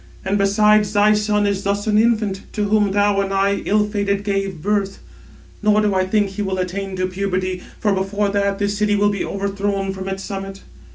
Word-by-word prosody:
And 200 +2 0
besides, 210 +1 +3
thy 210 +1 +4
son 210 0 +1
is 200 -1 0
thus 200 +1 -1
an 210 -1 +3
infant, 215 -4 +1
to 210 - -1
whom 210 -1 +3
thou 205 0 +2
and 195 0 -3
I, 195 +1 +1
ill 210 0 +2
fated, 200 -1 -1
gave 195 -3 -2
birth; 200 +2 -1 0.6
nor 210 0 +3
do 210 -1 +1
I 185 0 +1
think 205 0 +1
he 195 +2 -5
will 190 -2 -2
attain 190 +1 -3
to 185 0 -1
puberty; 185 -1 -2 0.2
for 205 -2 +1
before 200 +2 -1
that, 200 0 0
this 205 0 -1
city 210 0 +2
will 205 0 +2
be 200 - -2
overthrown 200 0 -2
from 190 0 -6
its 195 0 -4
summit. 195 0 -6
200 Hz, 205 wpm, -20 LUFS, 195-210 Hz, 0.6 s, thy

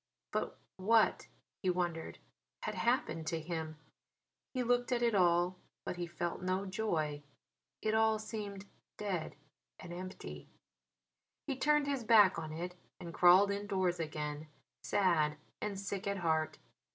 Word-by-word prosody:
But - - -2 0.2
what 220 +4 +3 0.3
he 185 - +1
wondered 175 -2 -1 0.5
had - - -2
happened 165 -10 0
to 165 0 0
him? 160 -1 -4 0.7
He 255 -2 -1
looked 245 +1 +2
at 240 -1 +2
it 235 -1 +3
all, 175 -1 +3 0.3
but - - -3
he 175 -1 -3
felt 170 +1 -3
no 185 +2 0
joy. 170 -8 -1 0.6
It 215 - +1
all 220 0 +4
seemed 210 -2 -6 0.3
dead 190 -6 -3 0.4
and 175 -1 -8
empty. 185 +1 -7 1.0
He 275 - -2
turned 295 +2 +3
his 280 -3 -1
back 210 -6 +6
on 155 -1 -5
it 175 +3 -4 0.3
and 170 -1 -7
crawled 185 +4 +7
indoors 195 -3 0
again, 150 -1 -4 0.3
sad 160 -6 +2 0.2
and 205 -2 -3
sick 200 0 -4
at 200 0 0
heart. 160 -3 0
185 Hz, 140 wpm, -34 LUFS, 170-215 Hz, 1.0 s, crawled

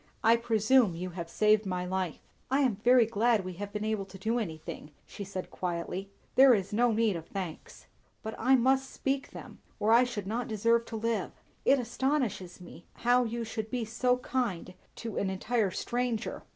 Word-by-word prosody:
"I 225 +1 +6
presume 230 -2 +3
you 180 +2 -5
have 170 -1 -6
saved 215 +2 +3
my 180 -2 -2
life." 185 -3 -2 0.3
"I 270 +2 +2
am 250 -8 +2
very 245 +2 +5
glad 225 -2 +1
we 185 - -5
have 205 0 -5
been 210 0 -3
able 215 -2 -1
to 190 0 -12
do 225 +5 0
anything," 160 -6 -6 0.2
she 205 - -8
said 190 -1 -6
quietly. 180 +2 -4 0.2
"There 265 -2 +7
is 195 0 -3
no 240 +2 +3
need 220 -2 +2
of 165 -1 -7
thanks." 185 -5 -7 0.4
"But 220 - -4
I 260 +3 +5
must 265 +2 +2
speak 270 0 -2
them, - - -11 0.2
or 215 - +2
I 235 +2 +7
should 235 -6 -4
not 230 +4 -2
deserve 230 +2 +2
to 225 - -7
live. 225 +1 -1 0.3
It 275 - +5
astonishes 245 -7 -1
me, 175 -1 -13 0.2
how 245 +1 +4
you 235 +1 -3
should 220 -1 -5
be 245 -1 -2
so 250 +3 +1
kind 240 -9 -2 0.2
to 225 -3 -6
an 195 - 0
entire 210 +2 0
stranger." 240 +2 -2
220 Hz, 190 wpm, -30 LUFS, 190-245 Hz, 0.4 s, There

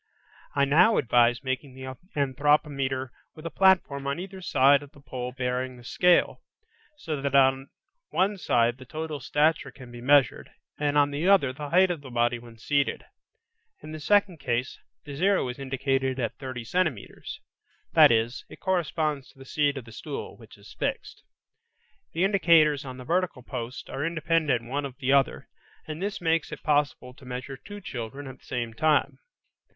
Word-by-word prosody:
I 140 -1 +4
now 180 +10 +5
advise 120 +1 +3
making 130 0 -4
the 130 0 -7 0.2
anthropometer 140 -1 +1 0.3
with 155 - -12
a 165 - -4
platform 175 -8 +3
on 140 +3 -2
either 190 +1 -8
side 140 -3 +4
of 145 +1 -13
the 145 - -17
pole 125 -3 -6
bearing 125 0 -3
the 120 - -14
scale, 180 +8 +2 0.6
so 155 - -4
that 140 0 -1
on 135 0 +4 0.4
one 200 +2 +1
side 120 -5 +1
the 130 - -11
total 155 +2 -5
stature 150 +4 +1
can 125 -3 -13
be 120 0 -10
measured, 140 +1 +3 0.3
and 145 0 +1
on 145 0 +4
the 150 +5 -1
other 185 -10 +4
the 145 +1 -7
height 185 +2 +4
of 165 -4 -4
the 135 - -10
body 120 0 +1
when 115 -1 -14
seated. 140 +4 0 0.8
In 155 - -8
the 155 - -6
second 200 0 +2
case, 125 0 -2 0.3
the 145 - -7
zero 190 +1 +2
is 125 - -7
indicated 135 -1 -1
at 115 -3 -1
30 130 -3 -6
centimetres; 155 - -3 0.5
that - - +8
is, 115 +2 0
it - - -12
corresponds 155 -6 -1
to - - -22
the 135 - -12
seat 145 +1 0
of 130 - -7
the 115 - -13
stool, - - -7
which - - -16
is - - -15
fixed. - - -3 0.9
The 170 - 0
indicators 165 -7 +4
on 130 -1 -7
the 125 - -9
vertical 170 -5 -1
post 120 +1 -6
are 140 - -4
independent 160 -6 +1
one 140 +4 -3
of 130 - -14
the 135 -1 +1
other 140 -1 +2 0.4
and 155 +2 -6
this 200 +1 -3
makes 165 -2 0
it - - -8
possible 145 -4 0
to 135 - -19
measure 130 +2 -6
two 205 +10 -10
children 135 - -6
at 130 -1 -10
the - - -23
same 120 -3 -3
time. 150 +5 +1
140 Hz, 180 wpm, -27 LUFS, 130-155 Hz, 0.9 s, that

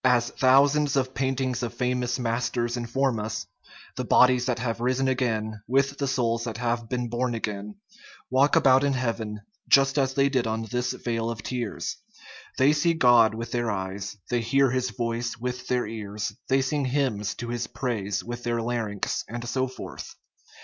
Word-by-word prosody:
As 125 -2 +3
thousands 140 +2 +4
of 130 -1 0
paintings 130 0 -1
of 120 -1 -4
famous 125 0 0
masters 120 0 -1
inform 120 0 0
us, 110 0 -4 0.5
the - - -1
bodies 125 0 +4
that 125 - 0
have 115 -1 -2
risen 130 +2 +1
again, 110 -4 -1
with 140 +2 +1
the 140 - 0
souls 115 -3 0
that 115 -2 -4
have 120 -1 -2
been 125 -1 -1
born 120 +1 -1
again, 105 -2 -4 0.6
walk 135 +3 +4
about 130 0 +5
in 140 -1 +2
heaven 115 -4 -2 0.3
just 135 +1 +5
as 135 -1 +1
they 140 0 +4
did 130 -4 0
in 110 0 -2
this 125 0 -1
vale 115 -1 -2
of 115 -3 -5
tears; 120 -4 -3 0.6
they 135 +3 +5
see 165 +3 +2
God 120 -6 +5
with 115 +1 -5
their 120 -1 0
eyes, 95 0 -4
they 120 -1 +2
hear 135 +3 +3
His 130 0 0
voice 115 +1 -3
with 125 +2 -4
their 125 -1 +1
ears, 105 -1 -5 0.2
they 135 0 +3
sing 140 +1 -1
hymns 125 -6 0
to 120 -1 -6
His 120 0 -2
praise 105 -6 -2
with 120 +1 -6
their 120 -1 -1
larynx, 115 -4 -2
and 120 +1 -6
so 130 +2 0
forth. 130 - -9
120 Hz, 175 wpm, -26 LUFS, 115-130 Hz, 0.6 s, about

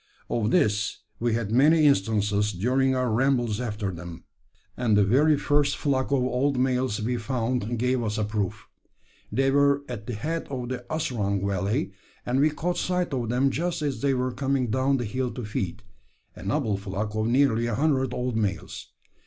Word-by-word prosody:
Of 110 -2 +1
this 105 - +1 0.2
we 120 -1 +1
had 110 -3 -2
many 150 +6 +5
instances 105 -4 +2
during 130 +7 +1
our 125 -2 0
rambles 120 -2 +1
after 105 -4 -3
them, 85 -1 -9 0.5
and 115 -4 +2
the 105 - +5
very 145 +9 +4
first 145 0 +1
flock 135 -3 0
of 135 -3 +2
old 130 +2 0
males 125 -3 +1
we 120 +3 -1
found 120 -1 -2
gave 125 +2 +1
us 105 -2 -2
a 110 - 0
proof. 105 0 -3 0.6
They 135 +1 +2
were 140 0 +3
at 115 -4 -7
the 120 - -3
head 160 +10 -3
of 125 -3 -4
the 125 -1 -4
Asrung 105 -11 -1
valley, 100 +2 -1 0.3
and 125 +2 +1
we 150 +2 +5
caught 175 +4 -2
sight 180 -4 -1
of 120 -4 -2
them 130 +3 +2
just 170 +1 -2
as 140 -3 -2
they 140 -1 +2
were 125 0 -1
coming 130 -2 -1
down 130 +3 +2
the 120 - -2
hill 125 +4 -2
to 125 - -5
feed 105 -1 -4 0.5
a - - -11
noble 105 +1 0
flock 100 +2 -4
of 110 0 0
nearly 120 -2 +3
a 115 - -1
hundred 135 -2 +1
old 125 -1 -2
males. 100 -3 -3
125 Hz, 185 wpm, -26 LUFS, 105-135 Hz, 0.6 s, many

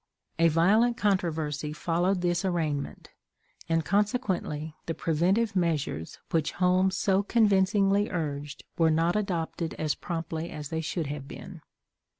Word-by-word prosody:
A 165 - +6
violent 210 +9 +3
controversy 160 -8 0
followed 175 +4 0
this 175 +1 0
arraignment, 160 -6 -2 0.6
and, 165 -1 +1
consequently, 195 -6 -1
the 165 - -2
preventive 190 +7 +1
measures 155 - -1
which 160 -2 0
Holmes 185 +1 +2
so 195 0 +2
convincingly 200 -1 +3
urged 145 -4 -4 0.2
were 165 -1 +5
not 165 +3 +2
adopted 175 -5 -2
as 155 -1 0
promptly 165 -1 -4
as 150 -2 -7
they 160 0 -2
should 165 +1 -2
have 140 -1 -5
been. - - -10
170 Hz, 130 wpm, -28 LUFS, 155-195 Hz, 0.6 s, A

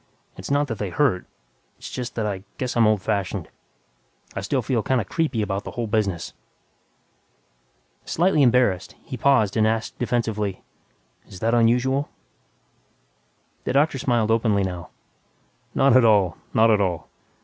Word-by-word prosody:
It's - - -8
not 145 +1 +2
that 115 -6 -5
they 105 - -2
hurt... 120 -4 +1 0.5
it's - - -9
just 125 -1 -5
that 110 - -1
I 95 -2 -3
guess 125 -2 -3
I'm 115 -2 +4
old 105 -3 +1
fashioned. 100 -3 -2 0.9
I - - -2
still - - -1
feel 120 -4 0
kinda 125 -2 0
'creepy' 135 - -1
about 100 -1 -3
the - - -6
whole 120 - -1
business." 105 -5 -1 1.7
Slightly 170 -2 +2
embarrassed, 120 -8 +2
he 130 - -7
paused 125 -5 +2
and 110 -1 +3
asked 110 0 -2
defensively, 110 -5 -1 0.6
"Is 95 - -11
that 115 +1 +1
unusual?" 125 +4 +2 1.6
The - - -1
doctor 140 0 +2
smiled 120 -3 +1
openly 110 -3 +2
now, 90 -2 -5 0.9
"Not 135 -2 +4
at 130 - +6
all, 100 -7 +4 0.2
not 115 +1 +4
at 105 -1 +3
all. 85 -6 -1
115 Hz, 150 wpm, -23 LUFS, 100-125 Hz, 1.7 s, at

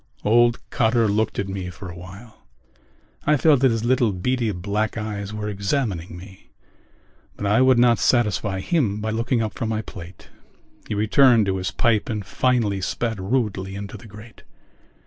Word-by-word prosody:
Old 120 +2 +4
Cotter 115 0 +2
looked 110 +1 0
at 100 - -2
me 95 -2 -5
for 90 +1 -9
a 90 - -8
while. 95 +6 -12 0.9
I 150 0 +4
felt 145 -1 +4
that 135 0 +4
his 115 -1 -1
little 125 -2 +2
beady 115 +5 -1
black 100 +4 -2
eyes 105 -2 -4
were 105 -1 -4
examining 100 - -2
me 95 +1 -14 0.9
but 105 - -4
I 105 +5 +3
would 130 -1 +5
not 120 -1 +4
satisfy 105 -5 +1
him 115 - 0
by 110 +1 -2
looking 115 +1 0
up 110 - -4
from 115 - -3
my 110 0 -2
plate. 85 -3 -11 0.6
He - - -3
returned 115 +2 +4
to 95 -1 -1
his 90 -1 -2
pipe 115 +1 +1
and 105 -3 -3
finally 115 -6 0
spat 110 +3 -2
rudely 95 -3 -2
into 100 0 -7
the 115 - -12
grate. 105 +2 -13
110 Hz, 170 wpm, -22 LUFS, 100-120 Hz, 0.9 s, would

